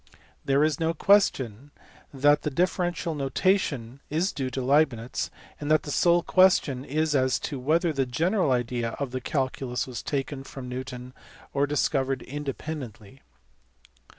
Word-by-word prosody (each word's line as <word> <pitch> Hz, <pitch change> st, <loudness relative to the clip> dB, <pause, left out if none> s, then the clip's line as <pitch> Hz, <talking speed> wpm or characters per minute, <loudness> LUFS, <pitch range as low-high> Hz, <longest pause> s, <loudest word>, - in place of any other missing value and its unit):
There 140 Hz, +1 st, +3 dB
is 155 Hz, -3 st, +1 dB
no 165 Hz, 0 st, 0 dB
question 140 Hz, -, +2 dB, 0.4 s
that 145 Hz, +2 st, +3 dB
the -, -, -1 dB
differential 175 Hz, +2 st, 0 dB
notation 140 Hz, -, 0 dB
is 165 Hz, +6 st, 0 dB
due 130 Hz, -2 st, -2 dB
to 130 Hz, -, -4 dB
Leibnitz, 130 Hz, -3 st, +1 dB, 0.3 s
and 145 Hz, -, -4 dB
the 155 Hz, -1 st, +2 dB
sole 175 Hz, +3 st, +3 dB
question 180 Hz, -8 st, +3 dB
is 155 Hz, +2 st, 0 dB
as 130 Hz, -1 st, +2 dB
to 140 Hz, -, -4 dB
whether 160 Hz, +5 st, +1 dB
the 135 Hz, -2 st, 0 dB
general 165 Hz, -, +1 dB
idea 120 Hz, -2 st, -1 dB
of 140 Hz, -3 st, -4 dB
the 130 Hz, 0 st, -3 dB
calculus 130 Hz, -2 st, -2 dB
was 125 Hz, -2 st, -6 dB
taken 135 Hz, -1 st, -3 dB
from 135 Hz, -1 st, -9 dB
Newton 125 Hz, 0 st, -6 dB, 0.4 s
or 140 Hz, 0 st, +2 dB
discovered 135 Hz, -3 st, 0 dB
independently. 135 Hz, -5 st, -6 dB
140 Hz, 140 wpm, -26 LUFS, 130-155 Hz, 0.4 s, There